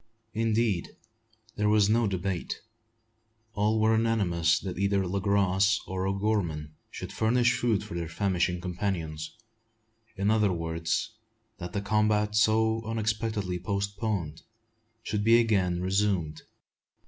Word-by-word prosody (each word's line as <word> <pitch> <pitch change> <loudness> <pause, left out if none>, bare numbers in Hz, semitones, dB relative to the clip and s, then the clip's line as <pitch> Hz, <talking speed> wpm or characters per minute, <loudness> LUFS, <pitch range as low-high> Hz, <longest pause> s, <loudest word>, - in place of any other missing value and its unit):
Indeed, 110 -4 0 0.6
there 105 -1 +2
was 105 -1 +4
no 115 +1 +3
debate. 95 -2 -3 0.9
All 105 +2 +1
were 110 +1 +4
unanimous 90 -7 +2
that 95 -1 -5
either 100 -1 +1
Le 95 +2 -2
Gros 100 +1 +2
or 95 0 -3
O'Gorman 95 -7 -1 0.2
should - - -7
furnish 125 +2 +2
food 110 -4 +1
for 105 - -9
their 85 -1 -3
famishing 90 -2 0
companions, 85 -4 -4 0.8
in 100 +2 +1
other 105 -3 +3
words, 80 +3 -2 0.5
that 90 -1 -6
the 100 - -1
combat, 105 0 +1
so 110 +1 +3
unexpectedly 110 -4 -2
postponed, 100 -3 -3 0.6
should 105 -1 -2
be 115 +2 +6
again 95 -6 +1
resumed. 95 -5 0
100 Hz, 120 wpm, -28 LUFS, 90-110 Hz, 0.9 s, be